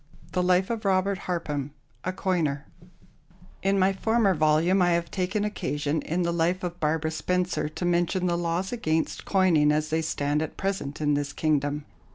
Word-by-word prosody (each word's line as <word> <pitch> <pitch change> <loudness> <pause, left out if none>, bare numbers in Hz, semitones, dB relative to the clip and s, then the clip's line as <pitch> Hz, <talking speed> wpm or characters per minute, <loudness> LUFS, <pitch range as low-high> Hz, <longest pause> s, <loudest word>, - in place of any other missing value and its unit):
The 180 - 0
Life 180 +3 +2
of 230 -1 -3
ROBERT 195 0 +1
HARPHAM, 150 -5 -3 0.3
a 185 - -1
Coiner 165 -7 -1 1.0
In 195 +1 +2
my 190 +1 +3
former 220 0 +2
volume 155 +4 +3
I 175 -1 +4
have 170 0 -1
taken 195 +3 -1
occasion, 150 -7 -2
in 175 +3 -1
the 170 0 0
life 175 +2 0
of 175 -1 -4
Barbara 160 +1 0
Spencer, 175 -2 -1
to 175 - -5
mention 175 +1 +1
the 175 -1 +1
laws 170 +2 -1
against 160 -9 -1
coining 170 -6 +4
as 155 +1 0
they 160 +1 +1
stand 145 -1 -1
at 160 - -5
present 190 -8 -3
in 150 -1 +2
this 145 0 -1
kingdom. 145 -1 0
170 Hz, 175 wpm, -26 LUFS, 155-185 Hz, 1.0 s, I